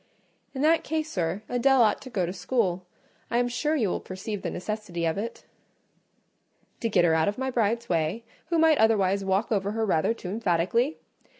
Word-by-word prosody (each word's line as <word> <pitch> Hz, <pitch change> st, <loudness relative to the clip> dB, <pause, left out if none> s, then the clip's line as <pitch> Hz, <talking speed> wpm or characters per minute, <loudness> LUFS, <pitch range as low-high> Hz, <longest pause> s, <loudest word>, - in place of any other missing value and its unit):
"In 265 Hz, -, -2 dB
that 325 Hz, +2 st, +4 dB
case, 315 Hz, 0 st, -2 dB
sir, 175 Hz, +3 st, -2 dB
Adèle 265 Hz, +2 st, +3 dB
ought 215 Hz, -3 st, +3 dB
to 260 Hz, -, -9 dB
go 195 Hz, -7 st, 0 dB
to 175 Hz, -, -4 dB
school: 185 Hz, -2 st, -1 dB, 0.4 s
I 235 Hz, -, 0 dB
am 245 Hz, 0 st, +2 dB
sure 300 Hz, +6 st, -1 dB
you 225 Hz, -10 st, +1 dB
will -, -, -1 dB
perceive 190 Hz, +2 st, -6 dB
the -, -, -3 dB
necessity 185 Hz, -3 st, -4 dB
of 160 Hz, -1 st, 0 dB
it." 220 Hz, +4 st, -5 dB, 1.3 s
"To 230 Hz, -, -1 dB
get 175 Hz, -, +3 dB
her 165 Hz, -, +3 dB
out 160 Hz, 0 st, +2 dB
of 205 Hz, -, -1 dB
my 265 Hz, 0 st, -2 dB
bride's 235 Hz, 0 st, 0 dB
way, 170 Hz, +5 st, -1 dB, 0.2 s
who 340 Hz, -, 0 dB
might 320 Hz, -2 st, +4 dB
otherwise 200 Hz, -3 st, +3 dB
walk 195 Hz, +4 st, 0 dB
over 200 Hz, -1 st, 0 dB
her 225 Hz, 0 st, 0 dB
rather 190 Hz, +3 st, +1 dB
too 180 Hz, -, -7 dB
emphatically? 215 Hz, -, 0 dB
215 Hz, 195 wpm, -26 LUFS, 185-245 Hz, 1.3 s, that